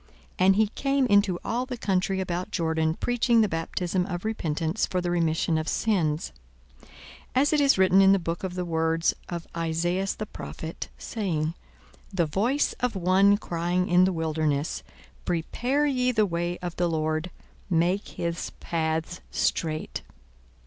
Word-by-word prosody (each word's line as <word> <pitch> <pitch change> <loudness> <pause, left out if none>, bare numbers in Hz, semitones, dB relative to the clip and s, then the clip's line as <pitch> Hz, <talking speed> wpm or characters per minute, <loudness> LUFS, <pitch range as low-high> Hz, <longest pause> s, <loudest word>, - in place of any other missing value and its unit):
42:003:003 185 - +4
And 195 - +6
he 215 +1 +4
came 275 +3 +1
into 205 -5 +3
all 245 +3 -1
the 250 -2 -5
country 190 -2 0
about 180 -1 -2
Jordan, 160 -2 0
preaching 240 0 +2
the 215 - +3
baptism 180 +2 -1
of 175 +1 -4
repentance 165 -6 -1
for 185 - -1
the 175 -1 -1
remission 165 -1 +1
of 155 - -4
sins; 165 - 0 0.5
42:003:004 - - -22 0.4
As 285 +4 +3
it 300 - +4
is 280 -5 +4
written 190 0 +5
in 195 0 +7
the 195 - +5
book 170 -1 -4
of 185 -1 -3
the 180 -1 -2
words 165 0 +1 0.2
of 170 -2 -4
Esaias 175 +3 0
the 215 - -4
prophet, 160 -5 -7
saying, 165 -8 -2 0.6
The 180 -4 +1
voice 230 - +1
of 250 -3 -1
one 190 +2 +4
crying 175 -1 -1
in 180 +1 +5
the 190 - +2
wilderness, 155 - -1 0.4
Prepare 245 - 0
ye 255 -3 +2
the 220 -3 +3
way 175 -1 -2
of 175 -1 -4
the 175 -1 +1
Lord, 155 +1 -1 0.4
make 180 +3 +1
his 170 0 -3
paths 160 +1 -2
straight. 155 -2 -1
180 Hz, 160 wpm, -26 LUFS, 165-200 Hz, 0.6 s, in